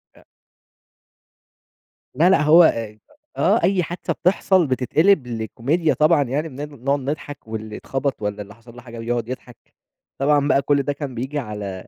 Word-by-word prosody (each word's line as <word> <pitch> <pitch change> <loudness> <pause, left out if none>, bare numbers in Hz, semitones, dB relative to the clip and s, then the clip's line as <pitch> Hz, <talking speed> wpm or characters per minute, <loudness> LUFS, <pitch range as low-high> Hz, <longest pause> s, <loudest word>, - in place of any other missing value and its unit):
أأ. - - -21 1.9
لا 165 +7 +4
لأ، 190 - +4
هو 155 +3 +7
إيه 110 -7 0 0.4
آه 215 +4 +2
أي 185 0 +2
حادثة 170 +2 -4
بتحصل 185 -1 +2
بتتقلب 140 +5 +2
لكوميديا 125 +8 -1
طبعًا 155 -1 +3
يعني 145 +5 -3
بن 145 -2 -9
نقعد 140 +1 +2
نضحك 145 -1 -6
واللي 110 -1 -6
اتخبط 135 -2 -3
والَّا 105 0 -3
اللي 100 0 -11
حصل 115 +1 -17
له 120 - -11
حاجة 120 -1 -10
يقعد 120 0 -2
يضحك، 125 -2 -10 0.5
طبعًا 145 +1 +2
بقى 140 - +3
كل 140 0 +1
ده 145 - -1
كان 140 -3 -6
بييجي 135 +5 -3
على 105 -6 -6
140 Hz, 160 wpm, -21 LUFS, 115-155 Hz, 1.9 s, هو